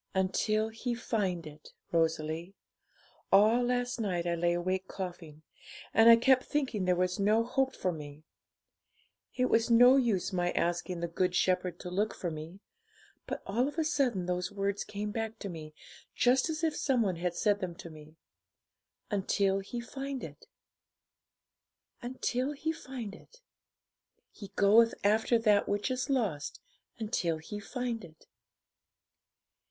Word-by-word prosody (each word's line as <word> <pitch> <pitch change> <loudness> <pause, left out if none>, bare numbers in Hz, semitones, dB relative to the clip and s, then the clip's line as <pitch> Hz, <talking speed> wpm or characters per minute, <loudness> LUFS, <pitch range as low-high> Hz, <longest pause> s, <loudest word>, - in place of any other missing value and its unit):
'"Until 215 +3 +1
He 235 +2 -3
find 195 -8 -2
it," 150 0 -12 0.2
Rosalie. 165 +2 -1 0.8
All 215 +5 +6
last 245 0 -1
night 180 -5 -1
I 170 - 0
lay 170 0 +1
awake 185 +2 -1
coughing, 175 -5 -7 0.5
and 225 +1 +7
I 230 - +11
kept 255 +2 +4
thinking 260 -10 -1
there 180 0 +3
was 180 +1 0
no 215 +3 +3
hope 265 +2 0
for 185 - -1
me; 150 -2 -9 1.1
it 250 - +2
was 230 -1 +2
no 245 +3 +7
use 215 -7 +1
my 175 -1 0
asking 175 +1 -1
the 170 - -1
Good 180 +2 0
Shepherd 180 -1 +1
to 180 - -6
look 205 +4 0
for 175 - -3
me. 160 +5 -8 0.7
But - - -5
all 235 +7 +1
of 290 - -7
a 320 - +2
sudden 255 - 0
those 180 +1 -2
words 200 0 -2
came 210 +1 -5
back 225 0 -4
to 200 - -6
me 155 -3 -9 0.4
just 255 +5 +3
as 315 0 -3
if 320 -2 +1
some 255 -5 +1
one 185 -4 -1
had 175 0 -2
said 205 0 +2
them 180 -4 -4
to 170 - -10
me. 155 0 -14 1.0
"Until 195 -1 +1
He 200 +5 -6
find 270 +2 -5
it - - -10 1.5
until 255 +2 -2
He 310 +3 -2
find 255 -9 -7
it. - - -16 0.9
He 205 - -10
goeth 225 +3 +5
after 220 +3 +3
that 210 -3 +3
which 205 +5 0
is 255 +1 -2
lost 205 - -1 0.4
until 185 -7 -1
He 205 +7 -7
find 235 +1 -4
it." 160 -2 -15
205 Hz, 150 wpm, -31 LUFS, 175-240 Hz, 1.5 s, I